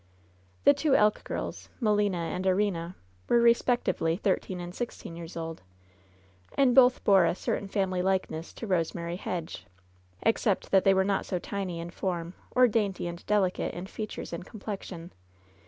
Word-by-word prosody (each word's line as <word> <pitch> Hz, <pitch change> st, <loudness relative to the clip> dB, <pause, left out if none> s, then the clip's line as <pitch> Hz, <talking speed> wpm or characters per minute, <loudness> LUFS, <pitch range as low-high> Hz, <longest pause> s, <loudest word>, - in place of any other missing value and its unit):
The 285 Hz, -, +7 dB
two 285 Hz, 0 st, +2 dB
Elk 210 Hz, 0 st, +3 dB
girls, -, -, -5 dB
Melina 210 Hz, -5 st, +2 dB
and 170 Hz, +2 st, -3 dB
Erina, 185 Hz, -3 st, 0 dB, 0.3 s
were 240 Hz, -, +5 dB
respec^ 235 Hz, +1 st, +3 dB
tively 165 Hz, +2 st, 0 dB
thirteen 185 Hz, -2 st, -1 dB
and 175 Hz, 0 st, -6 dB
sixteen 230 Hz, -6 st, -6 dB
years 170 Hz, 0 st, -8 dB
old, 165 Hz, -1 st, -5 dB, 1.0 s
and 270 Hz, -3 st, +5 dB
both 255 Hz, -1 st, +6 dB
bore 195 Hz, -3 st, +6 dB
a -, -, +1 dB
certain 200 Hz, -, -2 dB
family 190 Hz, -2 st, 0 dB
likeness 185 Hz, -3 st, -1 dB
to 230 Hz, -, -7 dB
Eosemary 170 Hz, -1 st, -1 dB
Hedge, 165 Hz, -, -5 dB, 0.6 s
except 220 Hz, -3 st, +1 dB
that 190 Hz, -1 st, +4 dB
they 195 Hz, -1 st, +6 dB
were 190 Hz, -, +4 dB
not 200 Hz, -1 st, 0 dB
so 185 Hz, -, -1 dB
tiny 185 Hz, -1 st, -4 dB
in 170 Hz, +1 st, -6 dB
form 175 Hz, -2 st, -3 dB, 0.2 s
or 250 Hz, 0 st, +5 dB
dainty 205 Hz, -5 st, 0 dB
and 170 Hz, 0 st, -6 dB
delicate 200 Hz, -3 st, +1 dB
in 175 Hz, -, -5 dB
features 215 Hz, -2 st, -6 dB
and 170 Hz, -, -4 dB
complexion. 195 Hz, -4 st, -7 dB
190 Hz, 160 wpm, -28 LUFS, 175-210 Hz, 1.0 s, The